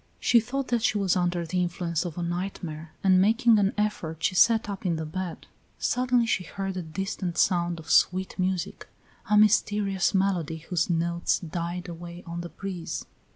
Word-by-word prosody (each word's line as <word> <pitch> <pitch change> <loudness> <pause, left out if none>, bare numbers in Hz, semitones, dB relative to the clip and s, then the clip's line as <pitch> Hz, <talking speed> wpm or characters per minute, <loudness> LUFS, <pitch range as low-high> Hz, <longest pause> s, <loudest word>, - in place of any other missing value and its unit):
She 235 - +5
thought 260 +4 -3
that 240 -2 +1
she 215 - +2
was 195 -3 +2
under 175 -1 0
the 180 +2 -1
influence 170 -1 -1
of 170 -2 -6
a 175 - -2
nightmare, 170 -3 -4
and 185 -1 +5
making 225 +2 +4
an 200 0 +2
effort 170 -7 -2
she - - +2
sat 225 +4 +4
up 200 -2 -5
in 175 -3 +1
the 160 0 -3
bed. 180 +2 -5 0.3
Suddenly 250 -1 +2
she 195 -5 0
heard 195 +2 -5
a 185 - -2
distant 175 +1 -4
sound 175 -2 +2
of 160 - -7
sweet 185 +1 +3
music, 185 -1 -2 0.4
a 210 - +5
mysterious 205 -2 +3
melody 180 -5 +1
whose 165 +1 -1
notes 170 0 +1
died 175 +1 -4
away 170 +1 -8
on 170 0 -5
the 175 - -7
breeze. 180 +1 -5
180 Hz, 180 wpm, -27 LUFS, 170-200 Hz, 0.4 s, She